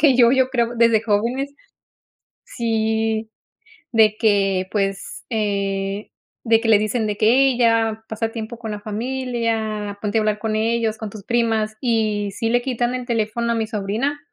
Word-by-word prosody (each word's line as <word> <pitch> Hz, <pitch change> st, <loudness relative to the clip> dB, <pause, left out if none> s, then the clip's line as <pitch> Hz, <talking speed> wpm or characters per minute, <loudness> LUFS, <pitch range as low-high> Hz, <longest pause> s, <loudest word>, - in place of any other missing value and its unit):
que 285 Hz, -3 st, +5 dB
yo. 240 Hz, -1 st, +6 dB
Yo 260 Hz, 0 st, +3 dB
creo 240 Hz, -2 st, -1 dB
desde 230 Hz, -1 st, +4 dB
jóvenes, 235 Hz, +6 st, 0 dB, 0.9 s
sí. 220 Hz, -1 st, -1 dB, 0.6 s
De 220 Hz, -2 st, +4 dB
que 195 Hz, -4 st, +2 dB
pues 195 Hz, -2 st, -2 dB
eh, 200 Hz, -2 st, -2 dB, 0.4 s
de 225 Hz, -1 st, +4 dB
que 230 Hz, -, -1 dB
le 215 Hz, -2 st, +6 dB
dicen 215 Hz, +2 st, -1 dB
de 210 Hz, -, -1 dB
que: 215 Hz, -, +3 dB
"Hey 260 Hz, +2 st, +4 dB
ya 225 Hz, -2 st, +2 dB
pasa 225 Hz, +1 st, -2 dB
tiempo 225 Hz, +1 st, -6 dB
con 225 Hz, -2 st, -5 dB
la 210 Hz, -, -5 dB
familia. 220 Hz, -2 st, -2 dB
Ponte 210 Hz, +1 st, -1 dB
a -, -, +3 dB
hablar 215 Hz, 0 st, 0 dB
con 220 Hz, 0 st, -2 dB
ellos, 225 Hz, 0 st, 0 dB
con 220 Hz, -1 st, -6 dB
tus 210 Hz, -3 st, -10 dB
primas". 225 Hz, -2 st, 0 dB
Y 215 Hz, -4 st, 0 dB
sí 225 Hz, +3 st, -2 dB
le 245 Hz, +1 st, +2 dB
quitan 245 Hz, -1 st, -1 dB
el 250 Hz, -1 st, -5 dB
teléfono 235 Hz, 0 st, -1 dB
a -, -, +1 dB
mi 225 Hz, -1 st, -1 dB
sobrina 220 Hz, +8 st, -2 dB
225 Hz, 170 wpm, -21 LUFS, 215-235 Hz, 0.9 s, yo